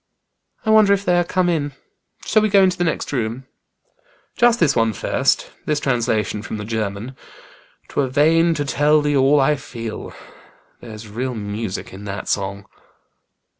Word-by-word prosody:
"I 220 Hz, -, +2 dB
wonder 215 Hz, -2 st, +6 dB
if 200 Hz, 0 st, -1 dB
they 180 Hz, -, +3 dB
are -, -, +2 dB
come 180 Hz, +1 st, 0 dB
in. 150 Hz, -5 st, -1 dB, 0.5 s
Shall 215 Hz, -, +3 dB
we 215 Hz, -, +1 dB
go 195 Hz, -1 st, +5 dB
into 185 Hz, -1 st, +3 dB
the 175 Hz, -, -1 dB
next 165 Hz, -3 st, -2 dB
room?" 120 Hz, 0 st, -3 dB, 0.9 s
"Just 240 Hz, 0 st, +4 dB
this 150 Hz, -5 st, +3 dB
one 115 Hz, -2 st, +2 dB
first -, -, 0 dB, 0.2 s
this 150 Hz, -1 st, +1 dB
translation 115 Hz, -5 st, -1 dB
from 110 Hz, -, -6 dB
the 105 Hz, -, -6 dB
German 110 Hz, +2 st, -4 dB, 0.4 s
' -, -, -29 dB
'Twere 140 Hz, -, -1 dB
vain 165 Hz, +5 st, +3 dB
to 145 Hz, -, -2 dB
tell 150 Hz, +1 st, +2 dB
thee 145 Hz, 0 st, +1 dB
all 140 Hz, +2 st, +4 dB
I 150 Hz, +2 st, +3 dB
feel.' 115 Hz, -5 st, -7 dB, 0.6 s
There's 110 Hz, -1 st, -10 dB
real 125 Hz, +4 st, -4 dB
music 105 Hz, -2 st, -5 dB
in 100 Hz, +2 st, -10 dB
that 100 Hz, 0 st, -5 dB
song." 100 Hz, 0 st, -2 dB
135 Hz, 170 wpm, -20 LUFS, 110-165 Hz, 0.9 s, wonder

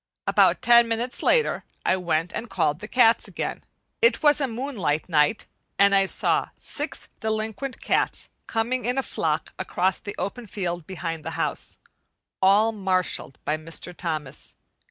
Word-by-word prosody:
About -, -, +3 dB
ten 235 Hz, -1 st, +6 dB
minutes 230 Hz, +2 st, -2 dB
later 475 Hz, -2 st, +2 dB, 0.2 s
I -, -, +4 dB
went 170 Hz, -2 st, -1 dB
and 240 Hz, -, -4 dB
called 150 Hz, +2 st, 0 dB
the 210 Hz, -, -7 dB
cats 230 Hz, -1 st, +4 dB
again. -, -, -4 dB, 0.4 s
It 465 Hz, -7 st, +4 dB
was 295 Hz, 0 st, +5 dB
a 275 Hz, -, +2 dB
moonlight 225 Hz, -, -2 dB
night 155 Hz, +4 st, +2 dB, 0.3 s
and 200 Hz, 0 st, +5 dB
I 195 Hz, 0 st, +5 dB
saw -, -, 0 dB
six -, -, -4 dB
delinquent 220 Hz, +4 st, -3 dB
cats -, -, 0 dB, 0.2 s
coming 240 Hz, +3 st, -1 dB
in 250 Hz, +2 st, 0 dB
a 270 Hz, -, +1 dB
flock -, -, -2 dB
across 185 Hz, +1 st, 0 dB
the 205 Hz, -, -7 dB
open 235 Hz, +3 st, -4 dB
field 175 Hz, -5 st, -4 dB
behind 165 Hz, -4 st, -4 dB
the 165 Hz, -, -4 dB
house, -, -, -3 dB, 0.6 s
all 205 Hz, +4 st, +5 dB
marshalled 185 Hz, -9 st, -1 dB
by 150 Hz, -, 0 dB
Mr. 165 Hz, +3 st, -5 dB
Thomas. 155 Hz, -7 st, -5 dB
200 Hz, 155 wpm, -25 LUFS, 170-235 Hz, 0.6 s, ten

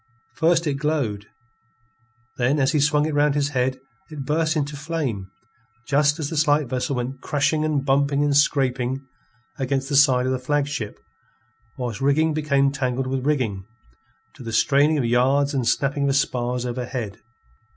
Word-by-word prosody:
First 165 Hz, +2 st, +2 dB
it 145 Hz, -3 st, -1 dB
glowed, 130 Hz, -9 st, -2 dB, 1.1 s
then 130 Hz, +4 st, +1 dB
as 135 Hz, -1 st, +2 dB
he 155 Hz, -, +1 dB
swung 150 Hz, +1 st, +2 dB
it 155 Hz, -, -2 dB
round 145 Hz, 0 st, +2 dB
his 145 Hz, -1 st, +1 dB
head, 130 Hz, -1 st, -1 dB, 0.3 s
it 150 Hz, -4 st, -7 dB
burst 160 Hz, +2 st, 0 dB
into 145 Hz, -1 st, -2 dB
flame, 140 Hz, -, -4 dB, 0.6 s
just 145 Hz, +1 st, +2 dB
as 155 Hz, -2 st, -4 dB
the 160 Hz, -, -3 dB
slight 150 Hz, 0 st, +3 dB
vessel 130 Hz, +2 st, -2 dB
went 130 Hz, +2 st, -4 dB
crashing 155 Hz, +1 st, 0 dB
and 150 Hz, -3 st, 0 dB
bumping 140 Hz, +1 st, +2 dB
and 145 Hz, -1 st, +1 dB
scraping 135 Hz, -2 st, +1 dB, 0.5 s
against 135 Hz, 0 st, -1 dB
the 145 Hz, -, -1 dB
side 130 Hz, -3 st, +5 dB
of 130 Hz, -, 0 dB
the 130 Hz, -, -1 dB
flagship, 145 Hz, -4 st, -2 dB, 0.8 s
whilst 125 Hz, -2 st, -4 dB
rigging 155 Hz, +3 st, +2 dB
became 140 Hz, -3 st, +1 dB
tangled 130 Hz, -2 st, -2 dB
with 130 Hz, +1 st, -2 dB
rigging, 115 Hz, -10 st, 0 dB, 0.7 s
to 135 Hz, -, -14 dB
the 115 Hz, -2 st, -6 dB
straining 145 Hz, +5 st, +3 dB
of 135 Hz, -, 0 dB
yards 135 Hz, +5 st, +2 dB
and 130 Hz, -4 st, -1 dB
snapping 140 Hz, +2 st, +1 dB
of 135 Hz, -, +1 dB
spars 125 Hz, -2 st, -1 dB
overhead. 120 Hz, -4 st, -5 dB
140 Hz, 160 wpm, -23 LUFS, 125-150 Hz, 1.1 s, side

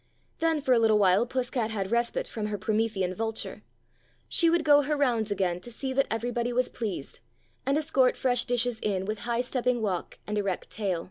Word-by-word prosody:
Then 325 Hz, -2 st, +1 dB
for 260 Hz, -2 st, +3 dB
a 240 Hz, -, +4 dB
little 220 Hz, -2 st, +4 dB
while 200 Hz, +3 st, +4 dB
Puss 255 Hz, 0 st, -2 dB
cat 230 Hz, -4 st, -1 dB
had 200 Hz, -2 st, -3 dB
respite 235 Hz, 0 st, 0 dB
from 215 Hz, -2 st, -4 dB
her 210 Hz, -1 st, -3 dB
Promethean 210 Hz, -3 st, 0 dB
vulture; 225 Hz, +2 st, -3 dB, 0.7 s
she 335 Hz, -, +3 dB
would 340 Hz, -1 st, +2 dB
go 290 Hz, -1 st, +6 dB
her 295 Hz, +1 st, -1 dB
rounds 235 Hz, -6 st, +1 dB
again 185 Hz, -3 st, 0 dB
to 210 Hz, -, -10 dB
see 265 Hz, +3 st, -4 dB
that 275 Hz, +1 st, +2 dB
everybody 240 Hz, +1 st, -1 dB
was 250 Hz, +1 st, +1 dB
pleased, 205 Hz, -11 st, -5 dB, 0.5 s
and 275 Hz, +2 st, +3 dB
escort 280 Hz, -5 st, +2 dB
fresh 245 Hz, -2 st, +2 dB
dishes 245 Hz, -1 st, +1 dB
in 195 Hz, -3 st, -1 dB
with 215 Hz, +1 st, -3 dB
high 235 Hz, 0 st, +1 dB
stepping 250 Hz, -1 st, 0 dB
walk 195 Hz, -6 st, -3 dB
and 210 Hz, 0 st, -1 dB
erect 195 Hz, -3 st, -3 dB
tail. 195 Hz, -5 st, -1 dB
230 Hz, 200 wpm, -28 LUFS, 210-255 Hz, 0.7 s, go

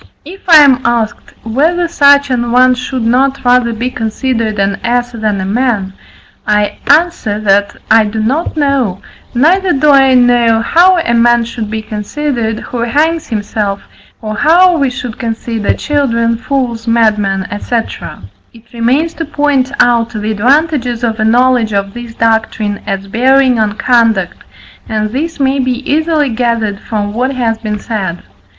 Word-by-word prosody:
If 375 Hz, +5 st, -11 dB
I 315 Hz, -3 st, +8 dB
am 265 Hz, -3 st, +4 dB
asked, 235 Hz, -2 st, -2 dB
whether 320 Hz, +10 st, 0 dB
such 285 Hz, -4 st, +3 dB
an 240 Hz, -1 st, -1 dB
one 255 Hz, +1 st, +4 dB
should 250 Hz, 0 st, -4 dB
not 260 Hz, +3 st, 0 dB
rather 245 Hz, -1 st, +3 dB
be 235 Hz, +3 st, -3 dB
considered 225 Hz, -1 st, -2 dB
an 195 Hz, 0 st, -1 dB
ass 245 Hz, 0 st, -1 dB
than 215 Hz, -4 st, -2 dB
a 190 Hz, -, -3 dB
man; 210 Hz, -3 st, -1 dB, 0.5 s
I 210 Hz, 0 st, 0 dB
answer, 295 Hz, -9 st, +1 dB
that 200 Hz, 0 st, +1 dB, 0.2 s
I 220 Hz, 0 st, +5 dB
do 215 Hz, +1 st, -4 dB
not 275 Hz, +10 st, -2 dB
know, 270 Hz, -10 st, 0 dB, 0.4 s
neither 355 Hz, +8 st, +2 dB
do 290 Hz, +2 st, +3 dB
I 270 Hz, -2 st, +5 dB
know 240 Hz, -2 st, +3 dB
how 355 Hz, +10 st, +3 dB
a 280 Hz, -8 st, 0 dB
man 235 Hz, 0 st, +3 dB
should 225 Hz, -2 st, -6 dB
be 220 Hz, 0 st, -4 dB
considered, 225 Hz, +1 st, -3 dB
who 245 Hz, -, -6 dB
hangs 300 Hz, +8 st, 0 dB
himself, 205 Hz, -2 st, -3 dB, 0.4 s
or 215 Hz, 0 st, -4 dB
how 345 Hz, -, +4 dB
we 280 Hz, -4 st, +1 dB
should 245 Hz, -2 st, -7 dB
consider 225 Hz, -2 st, -2 dB
children, 235 Hz, -6 st, 0 dB
fools, 245 Hz, -2 st, -3 dB
madmen, 210 Hz, -4 st, +1 dB
&c. 240 Hz, -, -4 dB, 0.8 s
It 230 Hz, +1 st, -19 dB
remains 260 Hz, +8 st, 0 dB
to 330 Hz, -, -5 dB
point 285 Hz, -3 st, 0 dB
out 235 Hz, -1 st, +3 dB
the 215 Hz, -1 st, -4 dB
advantages 250 Hz, +1 st, 0 dB
of 225 Hz, -1 st, -1 dB
a -, -, +1 dB
knowledge 240 Hz, -1 st, +2 dB
of 200 Hz, 0 st, -2 dB
this 240 Hz, -1 st, -9 dB
doctrine 220 Hz, -2 st, -1 dB
as 195 Hz, 0 st, -3 dB
bearing 255 Hz, +3 st, +2 dB
on 215 Hz, -2 st, 0 dB
conduct, 225 Hz, -5 st, +1 dB, 0.5 s
and 215 Hz, -1 st, -2 dB
this 315 Hz, +6 st, -4 dB
may 270 Hz, 0 st, +1 dB
be 255 Hz, 0 st, -2 dB
easily 310 Hz, -1 st, +1 dB
gathered 225 Hz, -4 st, -1 dB
from 205 Hz, -3 st, -4 dB
what 255 Hz, +4 st, -1 dB
has 225 Hz, -3 st, -1 dB
been 215 Hz, -2 st, -4 dB
said. 195 Hz, -5 st, -4 dB
235 Hz, 155 wpm, -12 LUFS, 220-270 Hz, 0.8 s, I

